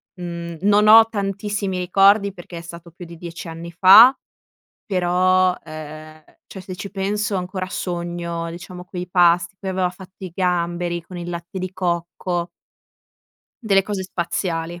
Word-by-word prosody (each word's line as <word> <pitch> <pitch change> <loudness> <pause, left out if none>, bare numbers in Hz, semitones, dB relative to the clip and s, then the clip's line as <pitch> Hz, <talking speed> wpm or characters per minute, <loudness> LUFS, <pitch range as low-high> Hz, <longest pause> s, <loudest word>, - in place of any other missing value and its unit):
mhmm, 170 -2 -7
non 210 +1 +4
ho 225 +1 +9
tantissimi 200 -2 -3
ricordi 195 +2 +3
perché 175 -2 -10
è - - -6
stato 170 0 -11
più 175 +1 -11
di 170 0 -11
10 170 0 -8
anni 165 +1 -8
fa, 205 +9 +8 0.7
però, 185 0 +2
ehm, 155 0 -10 0.2
cioè 190 - -10
se 185 -1 -8
ci 200 +2 -7
penso 200 +1 -2
ancora 185 0 -4
sogno, 170 -1 -4
diciamo, 180 +1 -9
quei 180 -1 -7
pasti. 175 +1 +3
Poi 190 -1 -4
aveva 185 -1 0
fatto 185 0 -14
i 180 - -6
gamberi 175 -1 -1
con 180 +1 -11
il 175 0 -6
latte 170 +2 -6
di 185 0 -5
cocco. 175 -1 -2 1.1
Delle 195 -3 +3
cose 200 -1 -4
spaziali, 170 -1 -3
180 Hz, 150 wpm, -21 LUFS, 170-190 Hz, 1.1 s, ho